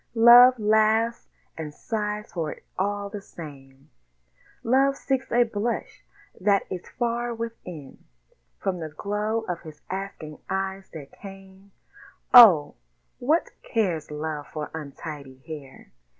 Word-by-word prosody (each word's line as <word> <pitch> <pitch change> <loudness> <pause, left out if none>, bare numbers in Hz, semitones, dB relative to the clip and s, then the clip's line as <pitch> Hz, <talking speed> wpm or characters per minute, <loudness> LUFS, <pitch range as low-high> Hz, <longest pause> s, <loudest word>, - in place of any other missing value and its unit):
Love 240 +2 +8
laughs 220 +2 +2 0.3
and 150 -2 -7
sighs 210 -2 -4
for 165 -4 -2
it - - -19
all 205 +1 -2
the 205 0 -7
same; 135 -6 -12 0.8
Love 270 +3 +3
seeks 265 -1 -2
a 240 +1 +5
blush 225 0 -4 0.4
that 200 +1 +3
is 180 - -6
far 240 0 -1
within 180 -11 -8 0.5
From 185 -2 -2
the 160 -1 -5
glow 210 +7 -2
of 180 -6 -5
his 155 -3 -13
asking 190 -6 -6
eyes 190 0 -3
that 145 -4 -9
came 195 0 -13 0.6
Oh! 205 -12 +9 0.5
what 305 +7 +1
cares 185 -9 -1
Love 150 -1 -5
for 150 -1 -6
untidy 145 -3 -8
hair? 145 -4 -10
195 Hz, 120 wpm, -25 LUFS, 155-225 Hz, 0.8 s, Oh